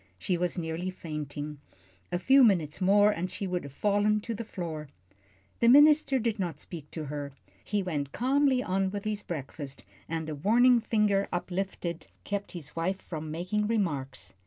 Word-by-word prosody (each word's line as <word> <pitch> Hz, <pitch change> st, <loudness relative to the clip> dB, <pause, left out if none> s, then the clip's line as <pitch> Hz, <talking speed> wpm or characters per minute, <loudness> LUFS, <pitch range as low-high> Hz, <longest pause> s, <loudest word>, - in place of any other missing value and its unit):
She 175 Hz, -, -1 dB
was 180 Hz, +2 st, -1 dB
nearly 165 Hz, +2 st, -3 dB
fainting. 150 Hz, -4 st, -6 dB, 0.5 s
A -, -, +1 dB
few 265 Hz, +8 st, +6 dB
minutes 175 Hz, -8 st, +2 dB
more, 205 Hz, +2 st, +5 dB
and 180 Hz, -1 st, -3 dB
she 195 Hz, -, -4 dB
would 180 Hz, -1 st, -2 dB
have 140 Hz, -, -8 dB
fallen 205 Hz, +6 st, +2 dB
to 230 Hz, -, -4 dB
the 230 Hz, -, -4 dB
floor. 165 Hz, -8 st, -5 dB, 0.7 s
The 235 Hz, -, +3 dB
minister 290 Hz, 0 st, +7 dB
did 230 Hz, -3 st, -1 dB
not 170 Hz, -6 st, -2 dB
speak 155 Hz, -4 st, -8 dB
to 160 Hz, -2 st, -5 dB
her. 145 Hz, -1 st, -5 dB, 0.3 s
He 205 Hz, -2 st, -1 dB
went 145 Hz, -6 st, -3 dB
calmly 265 Hz, 0 st, +2 dB
on 190 Hz, +1 st, 0 dB
with 200 Hz, +1 st, -5 dB
his 215 Hz, -1 st, -2 dB
breakfast, 140 Hz, -5 st, -6 dB, 0.3 s
and 160 Hz, -1 st, -3 dB
a 155 Hz, -, -3 dB
warning 235 Hz, -, +5 dB
finger 210 Hz, -3 st, +2 dB
uplifted 175 Hz, -1 st, -3 dB, 0.2 s
kept 205 Hz, 0 st, -4 dB
his 155 Hz, -5 st, -8 dB
wife 185 Hz, +4 st, -1 dB
from 155 Hz, -2 st, -6 dB
making 180 Hz, +7 st, -1 dB
remarks. 140 Hz, -, -2 dB
185 Hz, 170 wpm, -29 LUFS, 155-210 Hz, 0.7 s, minister